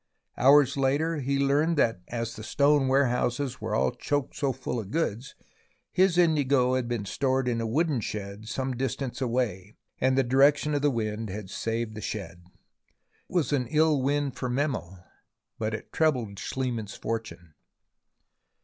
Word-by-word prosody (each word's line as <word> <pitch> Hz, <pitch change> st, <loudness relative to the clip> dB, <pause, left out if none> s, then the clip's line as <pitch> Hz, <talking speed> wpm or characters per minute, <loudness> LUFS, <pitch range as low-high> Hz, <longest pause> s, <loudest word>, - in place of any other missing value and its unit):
Hours 140 Hz, +1 st, +5 dB
later 145 Hz, +4 st, +1 dB
he 140 Hz, +1 st, 0 dB
learned 145 Hz, +4 st, +2 dB
that 115 Hz, -9 st, +2 dB
as 115 Hz, -1 st, -4 dB
the -, -, -8 dB
stone 140 Hz, +3 st, +3 dB
warehouses 130 Hz, -1 st, +1 dB
were 110 Hz, +1 st, +1 dB
choked 145 Hz, -2 st, -1 dB
so 140 Hz, -2 st, 0 dB
full 125 Hz, -1 st, -4 dB
of 100 Hz, -4 st, -6 dB
goods, 130 Hz, -3 st, -2 dB, 0.6 s
his 185 Hz, -1 st, +3 dB
indigo 140 Hz, -7 st, +3 dB
had 130 Hz, -2 st, 0 dB
been 120 Hz, -4 st, -2 dB
stored 130 Hz, +4 st, 0 dB
in 115 Hz, -2 st, 0 dB
a 115 Hz, -, -2 dB
wooden 150 Hz, +3 st, +1 dB
shed 100 Hz, +1 st, -6 dB
some 130 Hz, +3 st, -2 dB
distance 135 Hz, +1 st, -3 dB
away, 115 Hz, -6 st, -2 dB, 0.2 s
and 130 Hz, 0 st, +2 dB
the 135 Hz, -, +4 dB
direction 140 Hz, +4 st, +3 dB
of 145 Hz, -, +1 dB
the 145 Hz, -, +3 dB
wind 110 Hz, -3 st, -2 dB
had 100 Hz, 0 st, -6 dB
saved 115 Hz, 0 st, -2 dB
the 110 Hz, -, -7 dB
shed. 90 Hz, -5 st, -6 dB
It -, -, -27 dB, 0.8 s
was 160 Hz, -4 st, +1 dB
an 125 Hz, -4 st, +1 dB
ill 155 Hz, +1 st, +3 dB
wind 140 Hz, 0 st, 0 dB
for 125 Hz, 0 st, -3 dB
Memel, 125 Hz, -, -2 dB, 0.6 s
but 110 Hz, 0 st, -1 dB
it -, -, -10 dB
trebled 125 Hz, -11 st, 0 dB
Schliemann's 120 Hz, -5 st, -3 dB
fortune. 90 Hz, -8 st, -5 dB
130 Hz, 160 wpm, -27 LUFS, 110-140 Hz, 0.8 s, Hours